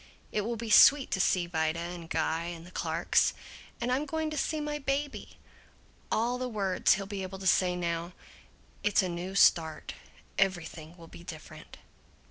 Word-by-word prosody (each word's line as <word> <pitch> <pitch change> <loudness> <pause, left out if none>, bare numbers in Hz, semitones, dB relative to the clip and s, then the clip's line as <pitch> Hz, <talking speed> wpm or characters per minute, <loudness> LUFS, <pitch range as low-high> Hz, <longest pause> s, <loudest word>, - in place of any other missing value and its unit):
It 210 - 0
will 230 +3 -2
be 225 0 -5
sweet 280 +4 +7
to 190 - 0
see 180 -1 +2
Vida 160 -1 -1
and 170 -1 -6
Guy 160 +1 -1
and 170 -1 -7
the 180 - -13
Clarks. - - +1 0.4
And 240 +1 -1
I'm 275 +4 0
going 315 +1 -2
to - - -4
see 310 +2 -1
my 295 0 -3
baby! 280 +1 -3 0.7
All 240 +3 0
the 255 0 -2
words 200 -5 +2
he'll 195 - -5
be 200 0 -5
able 190 0 -6
to 190 - -9
say 180 -1 +3
now! 170 0 -3 0.7
It's 205 -1 +3
a 185 - -2
new 175 +3 -5
start. 160 -5 +3 0.5
Everything 175 -3 -1
will 165 - -12
be 170 - -13
different!" 160 -3 -10
190 Hz, 175 wpm, -29 LUFS, 170-235 Hz, 0.7 s, sweet